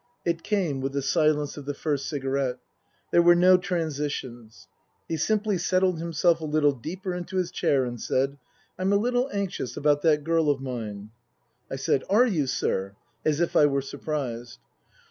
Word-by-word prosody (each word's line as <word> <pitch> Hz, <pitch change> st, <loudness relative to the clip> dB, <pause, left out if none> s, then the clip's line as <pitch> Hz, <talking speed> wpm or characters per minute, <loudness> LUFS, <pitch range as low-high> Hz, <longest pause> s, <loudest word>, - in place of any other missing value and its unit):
It 170 Hz, -1 st, 0 dB
came 175 Hz, -11 st, -1 dB
with 135 Hz, +1 st, -3 dB
the 140 Hz, -1 st, -1 dB
silence 150 Hz, -1 st, +1 dB
of 145 Hz, -, -8 dB
the 145 Hz, 0 st, -3 dB
first 145 Hz, -2 st, -2 dB
cigarette. 135 Hz, -3 st, -1 dB, 0.5 s
There 170 Hz, -, +5 dB
were 175 Hz, 0 st, +6 dB
no 180 Hz, +1 st, +6 dB
transitions. 145 Hz, -10 st, -4 dB, 0.4 s
He 165 Hz, -, -2 dB
simply 210 Hz, +3 st, 0 dB
settled 185 Hz, -2 st, +1 dB
himself 170 Hz, 0 st, +1 dB
a -, -, -3 dB
little 150 Hz, -1 st, +3 dB
deeper 180 Hz, +9 st, -5 dB
into 180 Hz, +2 st, -5 dB
his 180 Hz, -2 st, 0 dB
chair 135 Hz, -2 st, +1 dB
and 120 Hz, -2 st, -6 dB
said, 135 Hz, +2 st, 0 dB, 0.2 s
" -, -, -35 dB
I'm 190 Hz, +1 st, +1 dB
a -, -, +4 dB
little 245 Hz, +4 st, 0 dB
anxious 200 Hz, -10 st, -3 dB
about 145 Hz, 0 st, +2 dB
that 150 Hz, -2 st, +3 dB
girl 165 Hz, -1 st, +2 dB
of 140 Hz, -2 st, +1 dB
mine." 110 Hz, -6 st, -6 dB, 0.6 s
I -, -, -4 dB
said, 135 Hz, -, 0 dB
" -, -, -30 dB
Are 215 Hz, +6 st, +5 dB
you, 165 Hz, -, 0 dB
sir? 100 Hz, -5 st, -1 dB
" 115 Hz, +1 st, -43 dB
as 155 Hz, -1 st, +2 dB
if 170 Hz, -, 0 dB
I 150 Hz, -, +6 dB
were 140 Hz, -1 st, 0 dB
surprised. 135 Hz, -5 st, -5 dB
150 Hz, 185 wpm, -26 LUFS, 135-175 Hz, 0.6 s, were